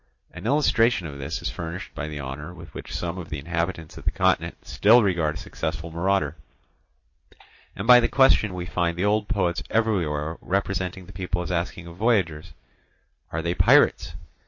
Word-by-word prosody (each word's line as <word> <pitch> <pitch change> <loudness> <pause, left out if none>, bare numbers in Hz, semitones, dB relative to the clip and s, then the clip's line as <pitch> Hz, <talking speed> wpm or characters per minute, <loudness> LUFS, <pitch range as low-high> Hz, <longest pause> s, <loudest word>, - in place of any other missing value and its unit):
An - - -7
illustration 120 - +3
of 70 -3 -7
this 70 - -4
is - - -2
furnished 85 +2 -6
by 75 - -4
the 75 -1 -6
honour 75 +5 -6
with - - -12
which - - -8
some 85 +1 -3
of 85 - -8
the 75 - -4
inhabitants 85 +1 -3
of - - -13
the - - +3
continent - - 0
still 115 +3 +5
regard 85 -6 +1
a - - -6
successful 80 -4 -5
marauder, 85 -2 0 1.4
and 100 - -5
by 125 +1 +9
the 120 - +2
question 115 -7 +4
we 90 -1 -4
find 85 -1 -1
the 90 - 0
old 105 0 +1
poets 90 -6 0
everywhere 85 -9 0
representing 95 -1 -2
the 95 - -13
people 90 -1 -2
as 85 - -5
asking 85 0 -2
of 85 0 -11
voyagers—"Are 80 - -3
they 85 0 0
pirates?" - - +4
90 Hz, 175 wpm, -25 LUFS, 80-100 Hz, 1.4 s, by